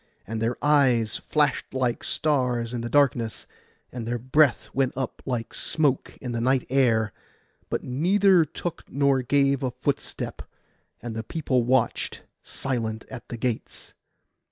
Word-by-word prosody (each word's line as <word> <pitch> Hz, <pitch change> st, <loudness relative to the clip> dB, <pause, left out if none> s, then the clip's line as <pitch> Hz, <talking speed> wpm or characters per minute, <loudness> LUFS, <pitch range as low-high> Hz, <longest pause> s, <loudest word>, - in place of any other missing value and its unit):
And 110 Hz, +1 st, -4 dB
their 115 Hz, +2 st, 0 dB
eyes 130 Hz, -7 st, +3 dB
flashed 150 Hz, -3 st, 0 dB
like 125 Hz, -2 st, 0 dB
stars 125 Hz, -6 st, 0 dB
in 120 Hz, -, -2 dB
the 120 Hz, -, -4 dB
darkness, 120 Hz, -6 st, +2 dB, 0.5 s
and 120 Hz, -2 st, -6 dB
their 120 Hz, +1 st, -1 dB
breath 130 Hz, +3 st, +3 dB
went 135 Hz, -1 st, +1 dB
up 130 Hz, -1 st, -3 dB
like 120 Hz, -3 st, -2 dB
smoke 145 Hz, -5 st, 0 dB
in 125 Hz, -, -5 dB
the 115 Hz, -1 st, -2 dB
night 130 Hz, +1 st, +2 dB
air; 115 Hz, -6 st, +3 dB, 0.6 s
but -, -, -2 dB
neither 180 Hz, +7 st, +4 dB
took 165 Hz, +2 st, -5 dB
nor 140 Hz, -1 st, +3 dB
gave 140 Hz, +1 st, +2 dB
a 130 Hz, -, 0 dB
footstep, -, -, -3 dB, 0.6 s
and 120 Hz, -2 st, -5 dB
the 110 Hz, -, -2 dB
people 130 Hz, +1 st, 0 dB
watched 125 Hz, 0 st, 0 dB, 0.2 s
silent 115 Hz, -5 st, -3 dB
at 125 Hz, -2 st, -9 dB
the 120 Hz, -, -5 dB
gates. 120 Hz, 0 st, -4 dB
130 Hz, 145 wpm, -25 LUFS, 120-140 Hz, 0.6 s, neither